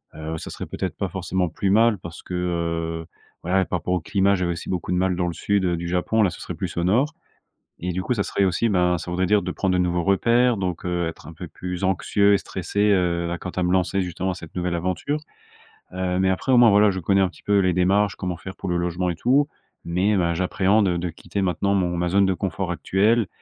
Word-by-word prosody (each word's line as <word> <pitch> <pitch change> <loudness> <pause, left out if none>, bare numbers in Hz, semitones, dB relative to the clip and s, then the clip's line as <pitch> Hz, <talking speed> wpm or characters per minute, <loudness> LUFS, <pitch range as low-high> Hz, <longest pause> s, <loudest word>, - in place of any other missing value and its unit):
heu 80 +1 -5
ça - - -7
serait - - -6
peut-être - - -4
pas - - -2
forcément 95 -1 -1
plus 95 +4 -2
mal, 110 0 +4
parce 85 0 -10
que, - - -8
heu, 85 -2 -2 0.4
voilà, 95 +2 +2
par 90 - -2
rapport 90 - -2
au 90 - +1
climat, 100 +4 +2
j'avais 90 -3 0
aussi 85 - -8
beaucoup 90 -2 -3
de 90 - +1
mal 90 0 +1
dans 90 0 -1
le 85 - -2
sud, 100 +3 0
heu, 85 -1 0
du 85 +1 -4
Japon, 90 +5 +1
là, 90 - +2
ce - - -10
serait - - -6
plus - - -5
au 85 - +1
nord. 125 - +2 0.7
Et 90 0 -1
du 95 +1 -2
coup, 125 - 0
ça 105 - -1
serait 100 - 0
aussi, 95 +5 +1
ben, 90 -3 +2
ça 90 - -7
voudrait 90 +1 0
dire 105 +3 +3
de 90 - -4
prendre 95 0 -1
de 90 - +2
nouveaux 90 -1 +1
repères, 115 +5 +3
donc, 90 -2 -3
heu, 85 -1 -1
être 80 - -8
un 80 - -9
peu 85 +2 -8
plus 90 +3 -6
anxieux 100 +2 +2
et 100 - +5
stressé, 100 +4 -1
heu, 85 -3 +1
à 85 - -3
quant 95 - -5
à 90 0 -2
me 90 - +1
lancer 95 +1 +1
justement, 90 +1 -3
cette 80 -3 -11
nouvelle 90 -1 -1
aventure. 90 - -1 0.8
Heu, 90 0 -1
mais 95 0 +2
après, 95 +8 -1
au 125 - +6
moins, 120 -2 +7
voilà, 105 +1 +5
je 95 - -3
connais 95 +3 +2
un 95 - +3
petit - - -17
peu 100 0 +3
les 90 -1 +2
démarches, 100 +4 +2
comment 90 -2 -3
faire 95 +3 -9
pour 95 - -5
le 90 - 0
logement 90 +1 -1
et - - -2
tout, 130 - +2 0.4
mais, 95 +5 +1
ben, 85 -2 +1
j'appréhende 95 +3 +2
de 90 - -2
quitter 90 +4 -5
maintenant 100 +1 0
mon 90 -3 0
ma 90 +1 0
zone 100 +2 +3
de 95 - +1
confort 95 -1 -3
actuelle. 100 +6 +2
90 Hz, 255 wpm, -23 LUFS, 85-100 Hz, 0.8 s, moins